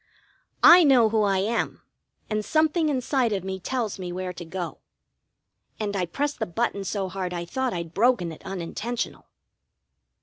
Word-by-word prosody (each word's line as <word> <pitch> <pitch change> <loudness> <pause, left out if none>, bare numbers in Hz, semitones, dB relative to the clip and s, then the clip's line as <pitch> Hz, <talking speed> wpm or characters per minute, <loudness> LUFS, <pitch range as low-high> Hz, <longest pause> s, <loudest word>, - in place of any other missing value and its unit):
"I 350 +1 +10
know 255 -7 +5
who 220 0 +2
I 200 -2 +2
am, 215 +5 -1 0.4
and 215 0 -1
something 315 - +2
inside 260 -3 +1
of 195 -3 -2
me 190 0 -4
tells 225 0 -3
me 180 -1 -5
where 180 0 -4
to 175 - -8
go." 175 +1 -5 1.0
And 205 -2 -2
I 180 -2 0
pressed 290 - -2
the 220 - -1
button 200 +2 -1
so 195 0 -2
hard 185 -1 -4
I 170 0 -3
thought 260 +7 -2
I'd 170 -3 -5
broken 210 -4 +2
it 160 - -11
unintentional. 195 +6 -4
205 Hz, 165 wpm, -25 LUFS, 180-245 Hz, 1.0 s, I